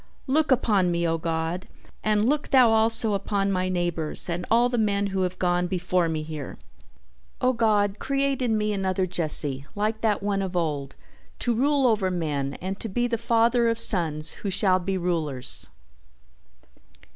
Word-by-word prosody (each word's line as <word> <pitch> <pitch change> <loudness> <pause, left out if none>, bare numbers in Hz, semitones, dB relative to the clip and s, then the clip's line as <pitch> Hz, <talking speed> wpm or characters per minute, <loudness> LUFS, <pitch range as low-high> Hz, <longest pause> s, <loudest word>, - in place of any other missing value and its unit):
"Look 300 +3 +1
upon 210 -8 +2
me, 170 0 0
O 165 0 -1
God, 165 +2 -3 0.4
and 215 +1 +2
look 295 +2 0
Thou 255 -4 +5
also 225 0 +2
upon 200 0 -1
my 185 -1 -1
neighbors 175 -3 0
and 175 +1 -3
all 235 +2 +4
the 245 -1 -1
men 205 -2 +1
who 190 - 0
have 185 0 -2
gone 180 -1 0
before 180 -1 0
me 155 -1 -3
here! 155 -2 -7 0.8
O 255 -1 +2
God, 210 -3 +1
create 275 -1 -1
in 230 -3 +1
me 210 0 0
another 190 -1 -1
Jesse, 150 -6 +3
like 215 +2 -2
that 210 -3 0
one 200 -1 0
of 185 -2 -3
old, 145 -5 -2 0.4
to 240 - -1
rule 275 +3 +2
over 215 -6 +2
men 145 -6 -2
and 190 +2 -6
to 225 - -4
be 240 +5 0
the 235 -2 -2
father 235 +1 +2
of 230 - -1
sons 165 -8 +1
who 200 - -3
shall 190 -1 +2
be 190 +1 -2
rulers!" 155 -8 -1
195 Hz, 170 wpm, -25 LUFS, 175-225 Hz, 0.8 s, Thou